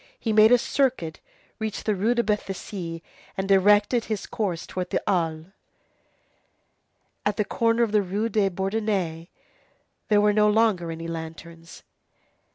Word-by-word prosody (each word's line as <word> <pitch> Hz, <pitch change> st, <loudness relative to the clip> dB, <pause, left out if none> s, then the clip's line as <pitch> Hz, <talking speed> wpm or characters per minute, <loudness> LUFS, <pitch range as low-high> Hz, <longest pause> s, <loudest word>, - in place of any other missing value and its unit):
He 225 Hz, -, -1 dB
made 215 Hz, +1 st, +6 dB
a 245 Hz, -, +8 dB
circuit, 245 Hz, -, -1 dB, 0.4 s
reached 220 Hz, -1 st, -4 dB
the 215 Hz, -, +2 dB
Rue 215 Hz, +5 st, +1 dB
de 235 Hz, -, +2 dB
Béthisy, 190 Hz, -5 st, -4 dB, 0.3 s
and 190 Hz, 0 st, -2 dB
directed 205 Hz, +4 st, +4 dB
his 215 Hz, -3 st, -3 dB
course 200 Hz, -8 st, -3 dB
towards 180 Hz, -1 st, -5 dB
the -, -, -1 dB
Halles. 165 Hz, -5 st, 0 dB, 1.8 s
At 205 Hz, -1 st, -1 dB
the 210 Hz, -, +1 dB
corner 230 Hz, +3 st, +1 dB
of 225 Hz, -, -1 dB
the 210 Hz, -1 st, +3 dB
Rue 200 Hz, +4 st, -2 dB
des 210 Hz, -4 st, +1 dB
Bourdonnais, 190 Hz, -3 st, -2 dB, 0.8 s
there 210 Hz, -1 st, +4 dB
were 210 Hz, 0 st, +3 dB
no 210 Hz, 0 st, +4 dB
longer 210 Hz, -6 st, +2 dB
any 165 Hz, 0 st, -6 dB
lanterns. 165 Hz, +1 st, -9 dB
205 Hz, 145 wpm, -25 LUFS, 170-220 Hz, 1.8 s, a